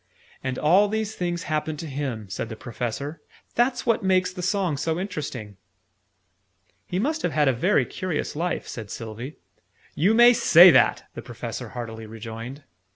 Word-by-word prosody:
"And 130 -1 -2
all 185 +7 +4
these 220 0 -2
things 175 -2 -3
happened 155 -1 -2
to 165 - -6
him," 135 -7 -4
said 95 +4 -5
the 110 - -6
Professor. 125 +6 -5 0.3
"That's 245 +2 +1
what 230 -2 +2
makes 185 -1 +2
the 180 - -6
song 185 -3 0
so 160 +3 -1
interesting." 140 - -5 1.3
"He 180 - -3
must 305 +10 0
have 170 - -1
had 150 0 +3
a 135 - +4
very 175 - +2
curious 180 -7 -3
life," 175 +3 -2
said 110 -4 -7
Sylvie. 115 +7 -7 0.6
"You 195 +9 +2
may 240 +1 +8
say 180 -7 +8
that!" - - +4
the - - -7
Professor - - -7
heartily 115 -2 -7
rejoined. 115 +5 -8
155 Hz, 160 wpm, -24 LUFS, 120-185 Hz, 1.3 s, may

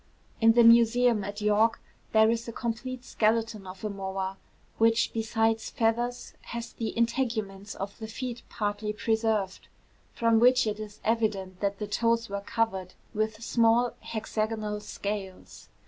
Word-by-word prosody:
In 225 0 +7
the 235 0 +6
Museum 230 -1 +5
at 205 +2 -5
York 210 +2 +3 0.3
there 220 0 +5
is 230 0 -2
a - - -4
complete 245 +2 -4
skeleton 220 -2 0
of 185 +2 -10
a 215 - -1
moa, 195 -1 -4 0.4
which 225 +1 +3
besides 225 0 0
feathers, 240 +2 -1
has 235 0 -6
the 225 -2 -3
integuments 225 -5 -1
of 200 +3 -6
the 220 - -5
feet 245 +1 -5
partly 210 0 -2
preserved; 220 -3 -1 0.4
from 230 -1 +3
which 250 +1 +5
it 215 -1 -2
is 210 -1 -8
evident 210 -5 0
that 200 -1 -1
the 210 - -3
toes 230 +2 +1
were 200 0 -3
covered 195 -4 -2 0.2
with 215 +1 -2
small 235 +1 +3
hexagonal 215 -1 -3
scales. 200 -2 -6
220 Hz, 145 wpm, -28 LUFS, 205-230 Hz, 0.4 s, In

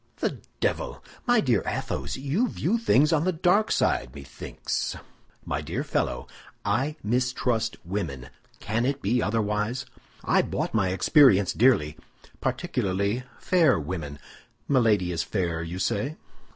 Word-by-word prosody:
"The - - -2 0.2
devil! - - -2 0.2
my 240 -2 +5
dear 120 -7 +2
Athos, - - -3
you 145 - 0
view 225 +1 0
things 155 - +4
on 155 -1 +3
the 185 - +2
dark 180 +5 +2
side, 60 - +1
methinks." 70 -1 -4 0.5
"My - - -2
dear - - -3
fellow, - - -1 0.4
I 130 +9 0
mistrust 120 0 0
women. 75 -10 -4 0.3
Can 110 +3 -1
it 140 0 -2
be 120 +5 +2
otherwise? 105 +3 -1 0.4
I - - +3
bought - - -3
my 100 -4 +2
experience 100 - +5
dearly—particularly 100 - 0
fair 165 - +3
women. 75 -2 -5 0.5
Milady 110 -9 +3
is 85 - -1
fair, 85 -5 -2
you 85 +2 -5
say?" 140 +10 -1
115 Hz, 125 wpm, -26 LUFS, 95-140 Hz, 0.5 s, my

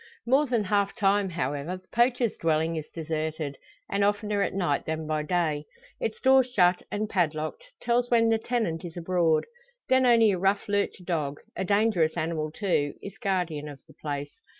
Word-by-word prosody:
More 270 +5 +3
than 235 -4 +1
half 200 0 +1
time 200 -3 +2
however, 155 +1 -3
the 185 - -21
poacher's 240 -1 +2
dwelling 160 0 +1
is 155 -1 -5
deserted, 155 -2 -3 0.3
and 200 0 0
oftener 205 0 +1
at 200 - -1
night 175 -7 0
than 160 0 -2
by 155 0 -1
day. 155 -2 0 0.3
Its 220 - -3
door 265 0 +6
shut, 185 -8 +2
and 215 +1 -1
padlocked, 165 - -1 0.2
tells 245 0 +1
when 230 -1 +4
the 225 0 +3
tenant 220 -9 -1
is 175 -1 -8
abroad. 170 -2 +2 0.4
Then 260 -1 +4
only 230 -3 +6
a 185 - -1
rough 195 +2 +1
lurcher 200 -2 -1
dog 150 -5 -2 0.2
a - - -2
dangerous 200 -5 +2
animal, 155 -1 -1
too 150 -5 -1
is 200 +2 -9
guardian 180 -8 -1
of 140 -2 -10
the - - -17
place. 145 -1 -5
185 Hz, 175 wpm, -27 LUFS, 155-215 Hz, 0.4 s, door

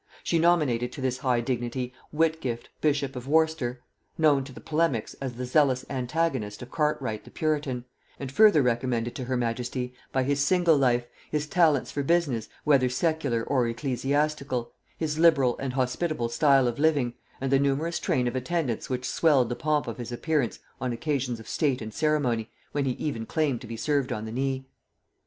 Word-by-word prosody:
She 165 - +1
nominated 150 -8 +2
to 140 - -7
this 130 -1 -1
high 125 -2 +1
dignity 125 +1 -3 0.2
Whitgift 155 -7 -1
bishop 140 -3 +1
of 125 +1 -6
Worcester, 155 -5 +1 0.3
known 150 -4 +4
to 135 - -10
polemics 150 -8 0
as 130 -2 -3
the 125 +2 -5
zealous 130 -1 +2
antagonist 130 -5 -1
of 125 - -12
Cartwright 140 -8 -1
the - - -13
puritan, 145 -6 -1 0.3
and 135 -2 -5
further 205 -4 +6
recommended 120 -1 0
to 130 - -5
her 130 0 -1
majesty 125 +1 -2 0.2
by 130 - +1
his 140 +2 0
single 175 +1 +4
life, 125 -3 +2 0.2
his 150 -1 -1
talents 155 -5 +2
for 145 - -2
business, 140 -7 +1
whether 135 -4 +4
secular 140 -4 0
or 130 -2 +1
ecclesiastical, 135 +1 -1 0.3
his 155 -1 -2
liberal 140 -7 +5
and 135 -2 -3
hospitable 130 0 -1
style 135 +1 +4
of 120 +2 -2
living, 145 -6 +2 0.3
and 135 0 -2
the 135 - +5
numerous 140 +5 0
train 125 -1 +1
of 120 - -2
attendants 130 -2 -2
which 130 0 -2
swelled 140 -7 +3
the 120 - -2
pomp 150 +1 0
of 115 0 -6
his 120 0 -5
appearance 140 0 0 0.2
on 130 - -1
occasions 125 -2 -2
of 110 - -12
state 140 -5 0
and 110 -1 -7
ceremony, 135 -8 +1 0.2
when 145 -1 0
he 130 - +1
even 115 -5 -4
claimed 150 -6 0
to 120 - -9
be 115 0 -6
served 140 +3 0
on 110 0 -3
the 110 - -6
knee. 135 +2 -2
135 Hz, 180 wpm, -27 LUFS, 120-150 Hz, 0.3 s, further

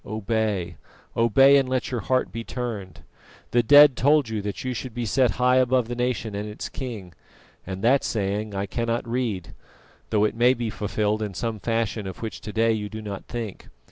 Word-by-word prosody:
Obey, 105 -4 -2 0.4
obey, 135 +5 +6
and 135 -2 +1
let 130 0 -1
your 125 - -1
heart 130 +6 0
be 115 - -5
turned. 105 -10 -6 0.5
The 120 - +4
dead 145 +3 +8
told 140 0 +3
you 110 -2 -2
that 100 0 -5
you 130 -1 -2
should 125 0 -6
be 120 -1 -2
set 125 +2 +3
high 125 +1 +4
above 130 -2 +2
the 120 - -4
nation 120 -3 -2
and 105 +1 -4
its 105 - -6
king, 110 - -7 0.5
and 95 0 -5
that 130 +4 +4
saying 105 0 -2
I 100 +1 -1
cannot 115 +3 -2
read, 115 -8 -2 0.6
though 105 -2 +2
it 105 - +1
may 120 +2 +4
be 115 -2 -3
fulfilled 105 +1 -1
in 105 -3 -4
some 115 +1 -3
fashion 115 -2 -1
of 95 - -8
which 110 - -5
to 105 - -6
day 115 +1 +2
you 105 -2 -2
do 110 - -7
not 100 -2 -6
think. 115 -5 -6
115 Hz, 200 wpm, -24 LUFS, 105-125 Hz, 0.6 s, dead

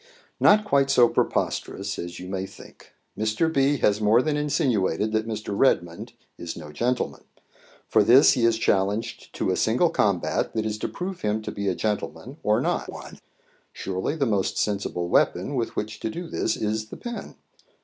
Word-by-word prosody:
"Not 210 +1 +5
quite 140 -7 +2
so 125 -3 +6
preposterous 100 -3 -1
as 85 0 -6
you 90 - -8
may 95 0 -3
think. - - -16 0.2
Mr. 110 +10 0
B. 140 0 +3
has 105 +1 +2
more 110 +4 +4
than 155 -1 0
insinuated 120 - 0
that 110 0 0
Mr. 110 -2 -4
Redmond 85 -9 +1 0.3
is 85 - -6
no 75 -3 -9
gentleman. 120 +10 -2 0.6
For 110 - +4
this 125 +7 +7
he 120 - 0
is 115 -1 +3
challenged 105 0 -1
to - - 0
a - - +1
single - - +2
combat - - 0
that 110 -1 0
is 110 0 -3
to - - -2
prove 185 +1 -6
him 105 +1 -1
to - - -4
be 100 0 -4
a 95 - +1
gentleman 110 - -3
or 105 +1 +2
not - - -1
one. - - -10 0.5
Surely 95 +10 -3
the 145 -4 0
most 100 -5 0
sensible 100 -4 -1
weapon 90 +7 +1
with 120 -4 -2
which 105 0 -4
to - - -3
do 170 +8 -6
this - - -1
is 110 0 -2
the - - -9
pen. 240 -1 -7
110 Hz, 180 wpm, -25 LUFS, 100-135 Hz, 0.6 s, this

